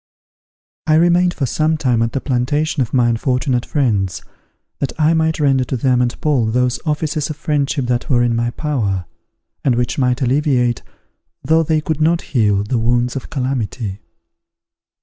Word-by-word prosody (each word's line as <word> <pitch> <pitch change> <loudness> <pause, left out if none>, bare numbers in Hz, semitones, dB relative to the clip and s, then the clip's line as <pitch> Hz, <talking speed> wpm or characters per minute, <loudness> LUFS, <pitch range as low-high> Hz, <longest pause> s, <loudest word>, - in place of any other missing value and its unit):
I 155 - +4
remained 175 +2 +3
for 140 - -1
some 155 +5 0
time 125 -7 +1
at 115 0 0
the 135 - -2
plantation 145 +4 0
of 120 - -1
my 125 -2 +3
unfortunate 125 +1 0
friends, 100 - 0 0.6
that 140 - -1
I 155 +1 +4
might 160 0 +1
render 135 -3 +3
to 130 - -3
them 125 0 +2
and 120 -1 -1
Paul 145 -8 +1
those 125 +2 0
offices 150 0 -1
of 155 - -4
friendship 145 -3 -1
that 120 0 -1
were 120 -3 +3
in 120 -1 +1
my 120 +1 0
power, 115 - -2 0.6
and 130 -4 +2
which 120 +3 -1
might 125 +1 +1
alleviate, 125 -2 +1 0.6
though 160 +4 +3
they 160 -1 +1
could 155 0 -3
not 165 +2 +2
heal 105 -5 +2
the 115 +3 -1
wounds 120 +2 +1
of 135 - -6
calamity. 125 -7 -3
130 Hz, 170 wpm, -18 LUFS, 120-150 Hz, 0.6 s, I